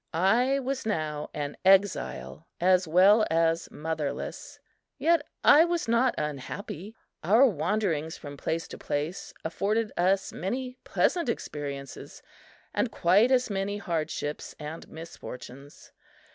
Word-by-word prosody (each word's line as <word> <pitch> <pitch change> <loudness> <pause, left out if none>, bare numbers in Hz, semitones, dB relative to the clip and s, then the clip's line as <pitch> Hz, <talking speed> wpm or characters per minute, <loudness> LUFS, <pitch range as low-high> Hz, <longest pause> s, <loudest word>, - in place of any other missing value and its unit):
I 235 +10 +3
was 270 0 -3
now 155 -8 -2
an 145 -1 -4
exile 65 - +2
as 185 0 +3
well 195 +7 +6
as 165 0 +1
motherless; 155 -2 -4 0.4
yet 335 -1 +3 0.2
I 300 +3 +8
was 345 -4 -1
not 235 +2 +3
unhappy. 155 - -5 0.3
Our 220 +11 +6
wanderings 175 - 0
from 145 -1 -9
place 165 +3 -3
to - - -9
place 150 +5 -3
afforded 210 +6 0
us 190 +2 +1
many 250 +6 -4
pleasant 340 -8 +1
experiences 140 - -6 0.5
and - - 0
quite 200 +8 +4
as 250 -3 +2
many 200 +1 -2
hardships 155 -5 -3
and 155 +2 -8
misfortunes. 140 -4 -10
180 Hz, 115 wpm, -28 LUFS, 150-220 Hz, 0.5 s, I